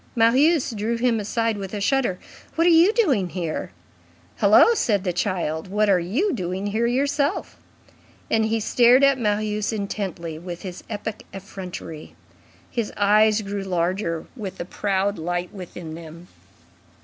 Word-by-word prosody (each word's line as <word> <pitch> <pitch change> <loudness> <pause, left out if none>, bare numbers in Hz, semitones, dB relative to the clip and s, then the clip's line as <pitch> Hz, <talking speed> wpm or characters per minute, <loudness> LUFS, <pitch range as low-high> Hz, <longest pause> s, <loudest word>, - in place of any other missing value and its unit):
Marius 265 +6 +4
drew 225 +2 -2
him 235 -1 +1
aside 225 +1 -1
with 195 0 -6
a - - -3
shudder. 240 -3 +1 0.4
"What 330 - +2
are 350 - +6
you 335 +5 +6
doing 285 - +2
here?" 170 -4 -4 0.7
"Hullo!" 470 - +6
said 210 - +1
the 180 -3 -1
child, 170 -3 -2
"what 210 +2 +2
are 185 - +4
you 255 - 0
doing 185 -3 -3
here 220 +3 0
yourself?" 280 +3 -1 0.7
And 220 0 +2
he 225 +1 0
stared 245 +4 +4
at 275 -1 +4
Marius 210 -1 0
intently 195 -6 -4
with 175 0 -8
his 185 -2 -7
epic 215 0 -6
effrontery. 185 -5 -8 0.6
His 230 -4 -2
eyes 215 +1 +4
grew 200 0 -4
larger 175 -2 -1
with 195 -6 -6
the 175 - -5
proud 200 +1 -1
light 175 +2 -3
within 175 -4 -8
them. 165 +1 -10
205 Hz, 150 wpm, -23 LUFS, 180-235 Hz, 0.7 s, are